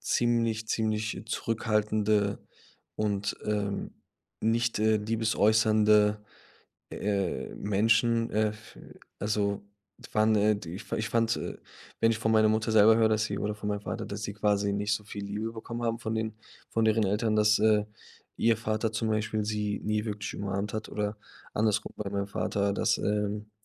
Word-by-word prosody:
ziemlich, 115 Hz, -2 st, +1 dB
ziemlich 110 Hz, 0 st, -1 dB
zurückhaltende 105 Hz, -2 st, 0 dB, 0.6 s
und, 100 Hz, -2 st, -1 dB
ähm, 105 Hz, -1 st, -2 dB, 0.5 s
nicht, 115 Hz, +1 st, +1 dB
äh, 110 Hz, 0 st, +3 dB
liebesäußernde, 110 Hz, -1 st, +3 dB, 0.7 s
äh, 100 Hz, -3 st, -2 dB
Menschen. 115 Hz, +3 st, +2 dB
Äh, 110 Hz, 0 st, +2 dB
f 110 Hz, 0 st, -12 dB, 0.4 s
also, 105 Hz, -1 st, 0 dB, 0.4 s
die -, -, -15 dB
waren, 110 Hz, +1 st, +4 dB
äh, 105 Hz, +1 st, +3 dB
die 90 Hz, -4 st, -7 dB
ich 100 Hz, -, -10 dB
ich 110 Hz, +1 st, -1 dB
fand, 115 Hz, -1 st, +2 dB
äh -, -, -5 dB, 0.4 s
wenn 115 Hz, 0 st, +4 dB
ich 115 Hz, -, -2 dB
von 110 Hz, 0 st, +1 dB
meiner 110 Hz, -1 st, +5 dB
Mutter 110 Hz, +1 st, +1 dB
selber 110 Hz, 0 st, +7 dB
höre, 110 Hz, -1 st, +4 dB
dass 110 Hz, 0 st, +2 dB
sie 100 Hz, -2 st, -3 dB
oder 105 Hz, 0 st, -2 dB
von 105 Hz, 0 st, -6 dB
meinem 105 Hz, -1 st, -2 dB
Vater, -, -, -4 dB
dass 100 Hz, +1 st, -6 dB
sie 100 Hz, -, -4 dB
quasi 105 Hz, -1 st, +1 dB
nicht 100 Hz, +1 st, 0 dB
so 105 Hz, -, -3 dB
viel 100 Hz, -1 st, -7 dB
Liebe 105 Hz, +3 st, -3 dB
bekommen 115 Hz, +1 st, -6 dB
haben 115 Hz, -1 st, -1 dB
von 110 Hz, -2 st, -3 dB
den 110 Hz, -1 st, -2 dB, 0.3 s
von 115 Hz, -1 st, +1 dB
deren 110 Hz, 0 st, +3 dB
Eltern, 105 Hz, +3 st, +1 dB
dass, 105 Hz, 0 st, +4 dB
äh, 105 Hz, -1 st, +4 dB, 0.5 s
ihr 115 Hz, 0 st, +3 dB
Vater 110 Hz, 0 st, -1 dB
zum 110 Hz, 0 st, -1 dB
Beispiel 110 Hz, 0 st, 0 dB
sie 105 Hz, -1 st, -2 dB
nie 105 Hz, +1 st, 0 dB
wirklich 105 Hz, -2 st, -4 dB
umarmt 100 Hz, +1 st, -3 dB
hat 110 Hz, 0 st, -4 dB
oder 105 Hz, 0 st, -3 dB, 0.4 s
andersrum 105 Hz, 0 st, +1 dB
bei 105 Hz, -2 st, -3 dB
meinem 100 Hz, 0 st, -2 dB
Vater, 100 Hz, 0 st, -1 dB
dass, -, -, +1 dB
ähm, 105 Hz, 0 st, -2 dB
105 Hz, 170 wpm, -29 LUFS, 105-110 Hz, 0.7 s, selber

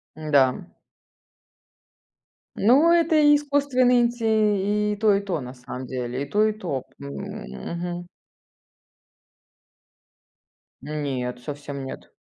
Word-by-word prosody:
Да. 145 Hz, -5 st, +2 dB, 1.9 s
Ну, 275 Hz, +11 st, +5 dB
это 335 Hz, -1 st, +3 dB
и 295 Hz, -1 st, +6 dB
искусственный 280 Hz, -4 st, +2 dB
инти 210 Hz, -3 st, +1 dB
и -, -, -3 dB
то 215 Hz, 0 st, +4 dB
и 200 Hz, -, 0 dB
то 185 Hz, -6 st, -3 dB
на 125 Hz, 0 st, -8 dB
самом 125 Hz, +1 st, -8 dB
деле, 125 Hz, +1 st, -4 dB
и -, -, -4 dB
то 210 Hz, +5 st, +3 dB
и 215 Hz, -, 0 dB
то. 170 Hz, -11 st, -4 dB, 0.2 s
М, 140 Hz, 0 st, -8 dB
мгм. 175 Hz, -, -6 dB, 2.7 s
Нет, 135 Hz, -5 st, -3 dB
совсем 140 Hz, 0 st, -7 dB
нет. 130 Hz, -, -9 dB
180 Hz, 110 wpm, -24 LUFS, -, 2.7 s, и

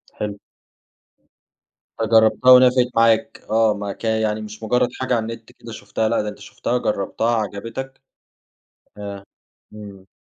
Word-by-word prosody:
حلو. 105 Hz, -1 st, -4 dB, 1.6 s
فجربتها 110 Hz, +2 st, +4 dB
ونفعِت 125 Hz, 0 st, +6 dB
معاك 115 Hz, -1 st, +2 dB
آه، 110 Hz, -1 st, +3 dB
ما 100 Hz, -1 st, -5 dB
كان 110 Hz, +1 st, -2 dB
يعني 110 Hz, 0 st, -1 dB
مش 105 Hz, +1 st, -10 dB
مُجرد 125 Hz, +2 st, +1 dB
حاجة 130 Hz, -1 st, 0 dB
على -, -, +1 dB
النت 115 Hz, -1 st, -14 dB
كده 115 Hz, -, -12 dB
شُفتها، 110 Hz, 0 st, -3 dB
لأ 115 Hz, -, +1 dB
ده 105 Hz, -, -4 dB
أنت 105 Hz, -, -11 dB
شُفتها 125 Hz, -, -3 dB
جربتها 115 Hz, +2 st, -1 dB
عجبتك 115 Hz, +6 st, -5 dB, 1.0 s
آه، 100 Hz, -1 st, -7 dB, 0.5 s
امم. 100 Hz, -3 st, -11 dB
110 Hz, 135 wpm, -21 LUFS, 105-115 Hz, 1.6 s, ونفعِت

